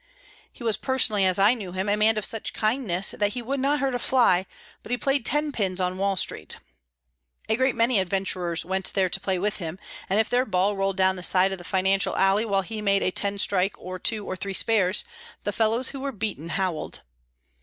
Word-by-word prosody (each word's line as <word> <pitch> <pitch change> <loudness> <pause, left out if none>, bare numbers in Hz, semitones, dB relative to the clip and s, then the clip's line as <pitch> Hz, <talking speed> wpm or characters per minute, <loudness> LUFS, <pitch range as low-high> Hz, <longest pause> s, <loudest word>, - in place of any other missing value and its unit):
He - - -13
was 225 -3 0
personally, 220 -7 +2
as 185 - +2
I 200 +4 +5
knew 200 -7 -7
him, 190 +2 -3
a 205 - +2
man 215 +1 +3
of 215 - -1
such 225 - 0
kindness 215 -5 +1
that 205 0 -1
he 245 -1 -5
would 270 +4 -2
not 280 +3 +1
hurt 270 -1 0
a 245 - -1
fly, 230 -9 +2 0.3
but - - -13
he 245 - 0
played 275 -2 0
ten 295 0 +1
pins 195 -7 -2
on 185 0 -1
Wall 195 -1 0
Street. - - -2 0.9
A 220 - +1
great 260 +1 +1
many 230 -1 +2
adventurers 185 -2 -1
went 190 +1 -1
there 190 -2 +2
to 195 - -1
play 190 -1 -1
with 205 +3 -2
him, 170 -2 -6 0.3
and 195 +3 +2
if 220 - +2
their 245 +1 +2
ball 195 +1 +1
rolled 195 0 -1
down 190 0 +2
the - - -7
side 185 +1 +3
of 190 - -5
the - - -10
financial 190 +2 0
alley 195 +3 +3
while 195 -3 0
he 215 +2 -6
made 200 -1 +2
a - - +1
ten 200 +2 -2
strike 195 -1 +1
or 185 0 -8
two 215 +2 -2
or 185 - -4
three 195 +1 -4
spares, 205 -3 +3 0.4
the 205 - -2
fellows 225 +4 +1
who 275 - -7
were 275 +1 -3
beaten 205 - -5
howled. 185 -2 -2
200 Hz, 225 wpm, -25 LUFS, 185-225 Hz, 0.9 s, I